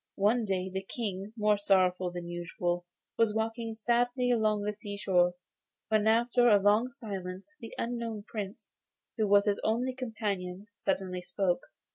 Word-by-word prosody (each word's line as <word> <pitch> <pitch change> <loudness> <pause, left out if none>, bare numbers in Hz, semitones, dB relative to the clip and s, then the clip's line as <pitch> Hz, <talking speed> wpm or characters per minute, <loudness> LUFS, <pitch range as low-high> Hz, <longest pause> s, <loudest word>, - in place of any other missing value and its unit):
One 215 +4 +3
day 190 -2 -1
the 190 0 -3
King, 195 -1 -4
more 210 -1 +3
sorrowful 185 -2 +3
than 175 -1 -6
usual, 175 0 -2 0.3
was 225 -2 +3
walking 225 0 -2
sadly 245 +2 +1
along 215 -3 +2
the 210 +1 -1
sea 205 -1 -7
shore, 180 -3 +3 0.5
when 215 -1 +3
after 240 +2 +4
a 205 -2 +6
long 210 +5 +4
silence 195 -4 -7
the 230 - -9
unknown 230 -3 -3
Prince, 205 -1 -7 0.5
who 215 - +3
was 200 0 +5
his 205 -1 +1
only 245 +4 +1
companion, 205 -7 -3
suddenly 190 -2 -2
spoke. 185 +3 -1
205 Hz, 150 wpm, -30 LUFS, 190-225 Hz, 0.5 s, a